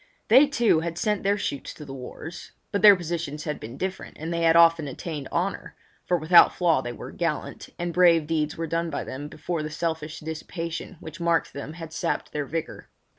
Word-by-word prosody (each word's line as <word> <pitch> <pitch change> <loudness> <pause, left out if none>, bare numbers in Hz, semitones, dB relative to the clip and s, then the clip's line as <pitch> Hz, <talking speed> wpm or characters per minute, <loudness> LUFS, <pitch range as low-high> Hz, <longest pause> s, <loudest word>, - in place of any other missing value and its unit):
They, 290 +3 +8
too, 240 - +3
had 165 +1 -4
sent 210 +3 0
their 200 +1 +1
shoots 140 -8 -4
to 150 - -10
the 135 - -8
wars; 135 +6 -9 0.2
but 200 - 0
their 205 -1 +10
positions 165 -4 -4
had 150 -2 -3
been 115 +4 -8
different 190 +3 -5
and 165 +2 -4
they 170 - -1
had 165 0 +4
often 165 -2 +6
attained 145 +1 -6
honour—for 180 0 -3
without 170 +2 +6
flaw 165 -6 +3
they 120 - -5
were 120 - -8
gallant, 165 -3 -3
and 175 -1 -3
brave 170 -3 +5
deeds 150 -1 -1
were 165 - -2
done 165 +1 -1
by 145 - -3
them 140 +3 -6
before 160 +2 -4
the 155 - -4
selfish 160 -1 -3
dissipation 165 +3 -5
which 160 +2 -9
marked 170 -1 +1
them 140 +2 -6
had 165 -1 -9
sapped 170 - -2
their 145 -2 -3
vigour. 165 +2 -5
165 Hz, 200 wpm, -25 LUFS, 150-175 Hz, 0.2 s, their